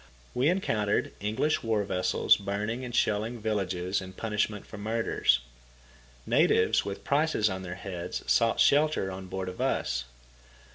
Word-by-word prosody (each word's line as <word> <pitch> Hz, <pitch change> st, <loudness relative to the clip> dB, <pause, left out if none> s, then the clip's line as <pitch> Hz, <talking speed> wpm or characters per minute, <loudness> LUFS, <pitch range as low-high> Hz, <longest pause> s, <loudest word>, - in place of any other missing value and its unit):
We 130 Hz, +5 st, +2 dB
encountered 110 Hz, -, 0 dB
English 110 Hz, +9 st, 0 dB
war 110 Hz, -2 st, 0 dB
vessels 90 Hz, -2 st, +3 dB
burning 105 Hz, +5 st, -3 dB
and 125 Hz, -1 st, -5 dB
shelling 110 Hz, +3 st, 0 dB
villages 95 Hz, -4 st, -1 dB
in 95 Hz, 0 st, -9 dB
punishment 105 Hz, 0 st, -2 dB
for 110 Hz, -, -10 dB
murders. 110 Hz, -, +1 dB, 0.8 s
Natives -, -, +3 dB
with 100 Hz, -1 st, -6 dB
prices 140 Hz, -8 st, +2 dB
on 95 Hz, 0 st, -4 dB
their 90 Hz, -1 st, -6 dB
heads 90 Hz, -1 st, -5 dB
sought 115 Hz, -1 st, +2 dB
shelter 145 Hz, -9 st, +3 dB
on 95 Hz, 0 st, -7 dB
board 95 Hz, 0 st, -4 dB
of 90 Hz, -, -6 dB
us. 65 Hz, 0 st, 0 dB
105 Hz, 140 wpm, -28 LUFS, 95-115 Hz, 0.8 s, vessels